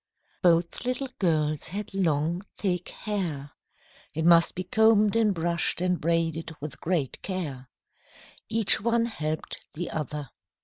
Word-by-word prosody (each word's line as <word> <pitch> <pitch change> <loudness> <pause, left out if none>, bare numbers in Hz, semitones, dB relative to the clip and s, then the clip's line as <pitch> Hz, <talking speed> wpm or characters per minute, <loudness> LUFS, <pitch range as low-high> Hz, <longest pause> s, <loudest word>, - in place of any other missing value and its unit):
Both 170 -2 +2
little 255 +2 -2
girls 155 -5 +1
had 200 +3 -5
long, 170 -2 0 0.2
thick 180 -3 -1
hair. 165 -10 -4 0.6
It 160 +1 -1
must 170 0 +5
be 185 - -3
combed 215 +1 +4
and 225 -2 +3
brushed 170 -2 +1
and 180 0 0
braided 165 0 -1
with 150 +1 -7
great 160 -6 -1
care. 145 -10 -5 0.8
Each 220 -2 +5
one 235 +1 +2
helped 155 -9 -4
the 175 +3 -5
other. 150 -3 -4
170 Hz, 130 wpm, -27 LUFS, 155-200 Hz, 0.8 s, must